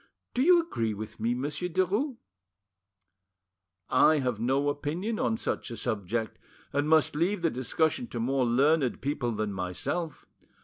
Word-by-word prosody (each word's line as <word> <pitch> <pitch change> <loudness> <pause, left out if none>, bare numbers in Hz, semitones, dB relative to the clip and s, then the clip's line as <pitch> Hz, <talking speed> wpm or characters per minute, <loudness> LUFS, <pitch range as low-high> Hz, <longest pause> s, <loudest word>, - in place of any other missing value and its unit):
Do 250 - +1
you 350 +5 +6
agree 115 - -2
with 110 +2 -8
me, 115 +2 0
Monsieur 145 +7 -2
Derues?" 205 - 0 1.7
"I 155 - +5
have 125 -6 -1
no 135 +5 +1
opinion 165 +10 -2
on 225 - +1
such - - -3
a 115 - -6
subject, 110 +1 -2 0.3
and 145 +2 +1
must 155 -2 +4
leave 175 +4 0
the 165 - +3
discussion 160 - 0
to 120 - -5
more 130 +3 +1
learned 135 +2 +2
people 135 -4 -1
than 105 -1 -2
myself. 95 - -3
145 Hz, 145 wpm, -28 LUFS, 115-175 Hz, 1.7 s, you